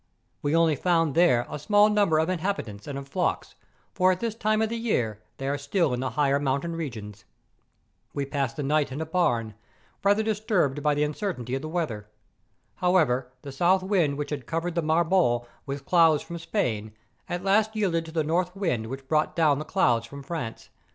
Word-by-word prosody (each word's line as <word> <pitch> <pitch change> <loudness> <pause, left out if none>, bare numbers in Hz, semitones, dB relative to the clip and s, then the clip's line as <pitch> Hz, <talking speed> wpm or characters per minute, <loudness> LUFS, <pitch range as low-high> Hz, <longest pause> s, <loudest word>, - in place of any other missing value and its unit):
We 145 +2 0
only 165 -2 +4
found 165 -1 +1
there 145 -8 +4
a - - -6
small 205 +7 +4
num¬ 210 -2 +3
ber 155 - +3
of 160 +1 +2
inhabitants 175 - -3
and 140 -1 -4
of 140 0 -7
flocks, 180 +6 -2 0.4
for 185 0 +4
at 185 - -1
this 230 -2 -2
time 215 -1 0
of 220 - -1
year 125 - -1 0.2
they 135 - -4
are 140 +1 -1
still 145 0 0
in 125 - -2
the 130 0 -1
higher 140 -1 +3
mountain 145 +4 -1
regions. 110 -9 -6 0.9
We 140 - -2
passed 140 -3 -2
the 150 - -2
night 145 0 +1
in 135 - -5
a 160 - -2
barn, 120 -10 0 0.5
rather 205 +2 +3
disturbed 205 -10 0
by 150 0 +2
the 145 - +1
uncertainty 150 - -3
of 135 - -1
the 155 - -6
weather. 125 -12 -3 0.7
However, 150 -9 +2
the 140 - -7
south 180 +7 +2
wind 175 -8 +1
which 145 0 -4
had 140 -5 -4
covered 165 +2 -2
the 170 - 0
Marbore 160 -6 +2 0.2
with 140 0 -5
clouds 165 -3 +4
from 170 0 -7
Spain, 110 - -2 0.4
at 175 +1 -3
last 215 +3 +2
yielded 175 -6 0
to 160 - -9
the 160 -1 0
north 175 +4 0
wind 150 - -1
which 135 +2 -7
brought 155 +1 +1
down 150 -4 +3
the 155 - -5
clouds 120 -10 +2
from 140 +3 -10
France. 140 -7 -6
155 Hz, 200 wpm, -26 LUFS, 135-180 Hz, 0.9 s, only